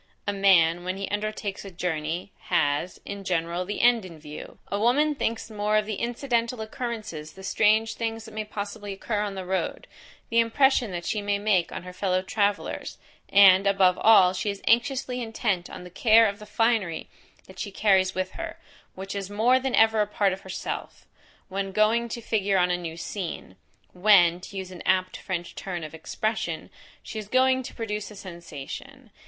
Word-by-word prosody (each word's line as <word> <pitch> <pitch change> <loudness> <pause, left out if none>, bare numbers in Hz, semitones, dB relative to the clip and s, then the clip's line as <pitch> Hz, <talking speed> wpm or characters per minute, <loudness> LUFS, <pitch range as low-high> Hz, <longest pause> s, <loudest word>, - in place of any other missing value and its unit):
A 205 - 0
man, 175 -4 +4
when 185 +1 -3
he 195 - -4
undertakes 205 -1 -3
a 200 - -8
journey, 170 0 -3
has, 165 0 0
in 200 0 -6
general 175 0 -1
the 205 +3 -3
end 240 -2 +5
in 175 -3 -10
view; 150 0 -10
a 200 - 0
woman 285 +7 +3
thinks 230 -5 -3
more 210 0 +1
of 215 - +1
the 215 -2 -3
incidental 240 -1 -1
occurrences, 215 -9 -5
the 190 - -12
strange 220 +3 +3
things 225 -1 -4
that 220 - -11
may 215 0 -3
possibly 205 -1 -6
occur 205 +2 -2
on 205 -2 -3
the 190 -1 -5
road; 190 +1 -2 0.5
the 230 - +4
impression 245 +1 +3
that 175 -2 -5
she 210 - -1
may 205 0 0
make 200 -4 +1
on - - -6
her 180 0 -9
fellow 185 0 0
travellers; 205 +1 -1 0.3
and, 195 0 +7
above 190 -2 +4
all, 190 -5 +6
she 205 - -2
is 200 -1 -5
anxiously 250 +1 +1
intent 215 -6 -2
on - - -9
the 180 - -11
care 225 +3 +5
of 200 +1 -4
the 210 - -11
finery 225 -8 0 0.4
that 190 0 -14
she 205 - -3
carries 190 -2 +2
with 185 0 -2
her, 335 0 -6 0.4
which 195 +1 -6
is 200 -1 -4
more 230 +5 +3
than 260 -1 -1
ever 220 -1 +5
a 210 - +1
part 205 -2 +1
of 190 - -7
herself, 190 0 -6 0.4
when 195 0 -3
going 220 +4 +2
to 235 - -5
figure 205 -3 +1
on 180 -1 +3
a - - +2
new 170 -2 -6
scene; 170 - -5 0.4
when, 180 -3 +5
to 195 +2 -9
use 190 -1 -5
an 180 - -9
apt 185 0 +1
French 175 -3 -4
turn 175 -3 -5
of 155 - -7
expression, 215 +7 -3 0.3
she 220 - -6
is 210 - -7
going 260 +2 +3
to 255 - -9
produce 210 -3 -4
a 210 - -11
sensation. 190 - -9
200 Hz, 190 wpm, -26 LUFS, 185-225 Hz, 0.5 s, and